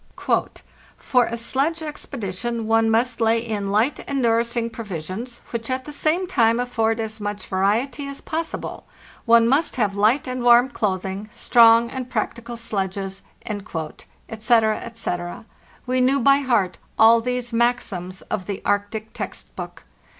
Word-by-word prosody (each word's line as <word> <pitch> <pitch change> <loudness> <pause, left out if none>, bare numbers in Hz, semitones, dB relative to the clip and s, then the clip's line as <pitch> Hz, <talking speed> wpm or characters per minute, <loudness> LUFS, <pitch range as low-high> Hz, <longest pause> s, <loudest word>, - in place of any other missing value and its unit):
"For 250 -2 +2
a 235 - -4
sledge 275 +8 -1
expedi 270 -10 -6
tion 235 +2 -3
one 225 0 +3
must 230 +2 +1
lay 225 0 +4
in 215 -4 -3
light 220 +8 +1
and 280 -1 0
nourishing 235 -1 +1
provisions, 215 +2 -6
which 230 0 -4
at 260 0 -2
the 295 - -7
same 315 +5 +1
time 235 -10 +2
afford 225 -2 0
as 220 -1 -4
much 205 -1 -4
variety 230 +9 0
as 280 0 -6
possi 320 +1 -3
ble; - - -8 0.4
one 230 -1 +6
must 280 +6 +2
have 210 -6 0
light 220 +8 +2
and 255 0 -3
warm 240 +1 +6
clothing, 195 -3 -3
strong 230 0 +5
and 255 -1 -5
practical 235 +1 -3
sledges," 195 -3 -3 0.3
etc., 215 +4 -1
ete—we 230 +4 -4
knew 265 +2 +3
by 275 +2 +5
heart 235 -9 0 0.2
all 230 +1 +7
these 250 0 -3
maxims 205 -6 -1
of 185 -3 -4
the 200 -2 -5
Arctic 210 +2 -1
text - - -7
book. - - -8
230 Hz, 145 wpm, -22 LUFS, 210-250 Hz, 0.4 s, all